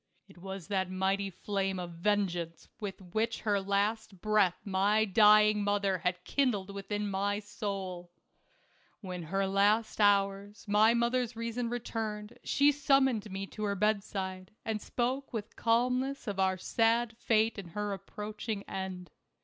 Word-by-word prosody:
It 195 -3 -17
was 190 -1 -7
that 190 -2 0
mighty 190 +1 0
flame 195 +1 -2
of 175 -1 -5
vengeance 175 -2 -1
which 200 -3 -4 0.2
with 225 +1 +1
her 205 -2 +1
latest 200 +1 -1
breath 210 -3 +2
my 205 +2 +2
dying 210 0 +6
mother 200 -2 +1
had 180 +1 -1
kindled 205 -8 0
within 205 +1 -3
my 200 +1 0
soul. 195 -4 -5 0.9
When 180 -3 -5
in 165 - -9
her 195 +3 0
last 205 +3 +2
hours 200 +1 +2
my 215 +3 +5
mother's 240 0 +1
reason 230 +1 -3
returned, 225 -2 -4
she 285 +1 +4
summoned 270 -6 +2
me 195 0 -4
to 215 - -7
her 200 -1 0
bedside, 195 -2 -1 0.2
and 220 -2 -2
spoke 255 +3 -2
with 215 -3 -5
calmness 250 +4 +1
of 200 -4 -4
our 190 -1 +2
sad 225 +4 +1
fate 220 -2 +2
and 185 -3 -8
her 210 -1 -2
approaching 210 +2 -5
end. 185 -4 -6
205 Hz, 145 wpm, -31 LUFS, 190-220 Hz, 0.9 s, dying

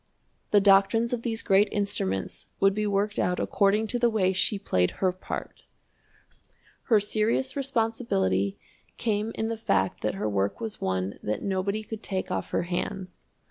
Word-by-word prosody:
The 205 - +5
doctrines 200 +4 +4
of 240 - -1
these 230 -2 -2
great 200 0 +4
instruments 200 - -2
would 195 0 +4
be 210 +1 -1
worked 205 +1 0
out 180 0 +1
according 205 +2 +2
to 245 - -1
the 240 0 +4
way 190 -4 +2
she 195 +3 +1
played 90 - +1
her 185 -1 +2
part. 185 - -7 1.2
Her 220 -4 +5
serious 220 +6 0
responsibility 225 - 0 0.4
came 215 -1 -1
in 220 - -1
the 230 - -3
fact 95 - 0
that 105 -1 -1
her 105 +2 -2
work 100 -1 -1
was 220 -2 -4
one 95 +1 -2
that 105 - -3
nobody 200 +2 -1
could 220 0 -7
take 190 -4 -3
off - - -2
her - - 0
hands. 185 +1 -4
200 Hz, 165 wpm, -27 LUFS, 180-220 Hz, 1.2 s, The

